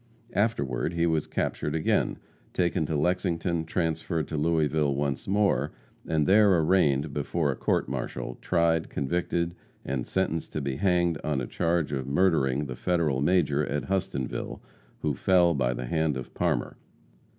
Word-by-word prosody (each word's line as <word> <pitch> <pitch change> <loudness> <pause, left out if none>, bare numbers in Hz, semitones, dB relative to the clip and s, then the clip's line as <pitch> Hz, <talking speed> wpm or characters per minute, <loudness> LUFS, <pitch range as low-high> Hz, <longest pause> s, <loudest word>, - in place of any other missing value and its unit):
Afterward 85 - 0
he 85 0 +1
was 80 -2 +1
captured 75 - -2
again, 80 - +1 0.4
taken 85 -3 +1
to 80 - -1
Lexington, 85 +1 0
transferred 80 -1 -1
to - - -3
Louisville 75 -2 +1
once 70 -1 -2
more, 100 +1 +1 0.3
and 80 -2 +1
there 100 0 +5
arraigned 75 -5 +2
before 80 -5 0
a - - -4
court - - 0
martial, 60 - -4
tried, 85 -2 +1
convicted 85 +3 -1 0.3
and 65 -3 -2
sentenced 90 -4 -1
to 75 - -2
be 70 -1 -2
hanged 85 -3 +2
on 75 -3 0
a 60 - -2
charge 85 +3 0
of 65 -2 -3
murdering 70 -3 +2
the 65 -2 -5
Federal 80 -4 0
major 75 -2 +2
at 75 +4 -3
Hustonville, 90 -9 -2 0.4
who 75 -2 +1
fell 85 +4 +3
by 65 -4 +1
the 60 0 -4
hand 80 +2 0
of 65 - -8
Parmer. - - -1
80 Hz, 150 wpm, -27 LUFS, 70-85 Hz, 0.4 s, there